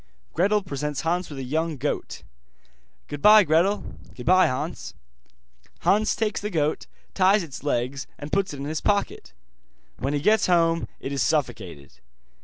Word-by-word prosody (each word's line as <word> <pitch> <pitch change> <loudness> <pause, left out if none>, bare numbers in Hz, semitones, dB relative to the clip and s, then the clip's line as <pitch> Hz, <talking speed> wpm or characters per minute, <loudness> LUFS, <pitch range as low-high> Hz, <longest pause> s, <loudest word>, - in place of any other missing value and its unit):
Gretel 200 +4 +2
presents 145 -4 -4
Hans 175 +2 -1
with 145 - -8
a 135 - -5
young 155 +4 -2
goat. 140 +3 -4 0.8
'Goodbye, 210 +9 +6
Gretel.' 175 +6 +2 0.3
'Goodbye, 185 +9 +4
Hans.' 130 - -4 0.9
Hans 215 +2 +2
takes 220 -2 -1
the 210 - -3
goat, 155 -5 -1 0.3
ties 195 +1 +3
its 140 -5 -9
legs, 130 -1 -2
and 145 +1 -8
puts 195 -1 0
it 145 - -7
in 140 - -5
his 155 +1 -3
pocket. 205 -1 -1 0.7
When 135 +2 -2
he - - 0
gets 215 +8 +3
home 165 -2 +2
it 135 - -6
is 140 -2 -1
suffocated. 110 - -2
160 Hz, 150 wpm, -24 LUFS, 140-195 Hz, 0.9 s, Goodbye